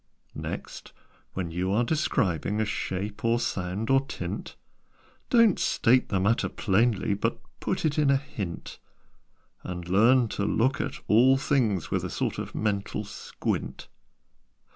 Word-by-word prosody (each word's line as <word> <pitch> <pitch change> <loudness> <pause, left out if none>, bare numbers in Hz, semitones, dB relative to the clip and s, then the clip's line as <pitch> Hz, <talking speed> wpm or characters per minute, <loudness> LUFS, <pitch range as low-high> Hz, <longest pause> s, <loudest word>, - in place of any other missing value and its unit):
"Next, - - -7 0.4
when 90 -3 -3
you 90 +3 -1
are 110 +5 +3
describing 110 - 0
A 110 - +2
shape, 100 0 -4
or 115 +1 +2
sound, 95 +2 -2
or 135 0 +4
tint; 135 - -6 0.7
Don't 230 -6 +5
state 125 +2 +3
the 95 - +1
matter 105 +5 +1
plainly, 105 0 +1
But 115 +4 -1 0.2
put 185 - -2
it 155 0 +1
in 145 -2 +3
a 140 - +5
hint; 110 -11 -6 0.8
And 90 -1 -6
learn 115 +7 +5
to 100 - -2
look 115 +6 +1
at - - -3
all 130 +5 +5
things 120 - 0
With - - 0
a - - -3
sort - - -2
of - - -6
mental 105 0 -1
squint." 100 - -4
110 Hz, 140 wpm, -27 LUFS, 95-130 Hz, 0.8 s, Don't